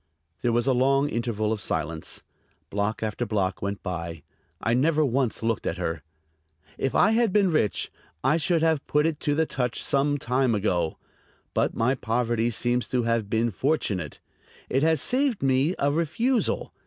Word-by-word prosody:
There 120 - +1
was 120 0 +2
a 135 - +3
long 135 +3 +3
interval 115 -3 -1
of 105 - -4
silence; 80 -4 -2 0.5
block 105 +2 -1
after 110 +2 -2
block 100 -5 -1
went 100 0 -3
by. 85 -3 -5 0.4
I 115 - 0
never 150 +4 +3
once 130 -3 0
looked 115 -1 -1
at 85 - -2
her. 85 -3 -3 0.7
"If 135 - -2
I 210 - +5
had 225 -2 +2
been 195 -2 +3
rich 130 -10 0 0.3
I 150 +4 +3
should 165 +1 +1
have 160 -3 +1
put 150 +1 +2
it 160 -2 -1
to 145 - 0
the 160 +1 +2
touch 125 -5 -2
some 145 +1 +2
time 125 -2 +1
ago; 90 -6 0 0.6
but - - 0
my 120 +3 +2
poverty 120 -1 0
seems 120 +1 0
to 125 -2 0
have 115 -3 0
been 115 +1 +1
fortunate; 100 - -1 0.5
it 135 - +2
has 160 0 +3
saved 255 - +1
me 135 +6 +2
a 140 +1 +1
refusal. 170 - 0
125 Hz, 170 wpm, -26 LUFS, 110-150 Hz, 0.7 s, I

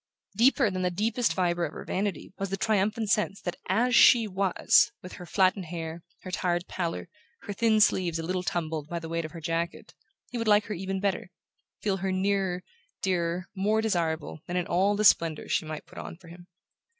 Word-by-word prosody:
Deeper 240 -1 +4
than 185 0 -3
the 180 - +1
deepest 220 +6 0
fibre 175 -2 0
of - - -3
her - - -8
vanity 190 -3 -3
was 195 0 -2
the 195 - -2
triumphant 215 +2 +1
sense 200 -2 +1
that 175 - -4
AS 235 +6 +2
SHE 230 -1 +7
WAS, 190 -1 +3
with 180 - -9
her 180 - -9
flattened 185 +1 +2
hair, 165 0 -6 0.2
her 185 - -7
tired 175 -1 0
pallor, 170 -2 -3 0.4
her 205 - -5
thin 220 +1 +3
sleeves 185 -5 +3
a 165 - -4
little 180 +2 -1
tumbled 160 -4 -3
by 175 - -3
the 165 -1 -6
weight 165 0 -2
of 155 - -7
her 170 - -7
jacket, 165 +2 -3 0.4
he 245 - -3
would 230 - -2
like 210 0 +5
her 215 - -4
even 190 +1 -3
better, 195 -2 -1 0.5
feel 200 -2 +1
her 190 +1 -2
nearer, 190 -1 0 0.4
dearer, 175 -1 0
more 210 +3 +1
desirable, 165 -8 -1
than 175 - -2
in 180 - 0
all 190 +4 +2
the 215 +1 0
splendours 165 -5 +3
she - - +1
might 155 -1 -6
put - - -11
on - - -8
for 175 -2 -16
him. 175 +1 -13
185 Hz, 205 wpm, -28 LUFS, 170-205 Hz, 0.5 s, SHE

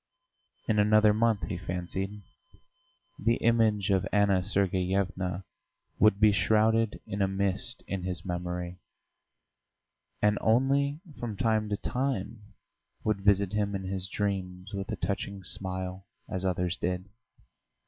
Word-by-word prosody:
In 105 -2 +2
another 105 0 +5
month, 110 -1 +2
he 90 -4 -3
fancied, 95 +3 -4 1.0
the 115 +1 +2
image 110 -4 +2
of 95 0 +2
Anna 100 -2 +3
Sergeyevna 95 -1 0 0.6
would 105 -2 +5
be 105 0 +6
shrouded 110 +3 +2
in 100 +1 -3
a 95 - +3
mist 100 +5 0
in 95 -1 -3
his 90 0 -4
memory, 90 0 -4 1.4
and 105 0 +2
only 140 +6 +2 0.2
from 110 -4 -4
time 110 0 +1
to 100 - -1
time 125 -5 -2 0.6
would 105 -2 0
visit 100 0 +3
him 100 -1 0
in 95 - -3
his 95 0 -2
dreams 95 -1 -3
with 100 +1 -4
a - - -1
touching 100 -1 -3
smile 95 +1 -2 0.2
as 95 0 -4
others 90 0 0
did. 90 0 -2
100 Hz, 130 wpm, -29 LUFS, 95-105 Hz, 1.4 s, be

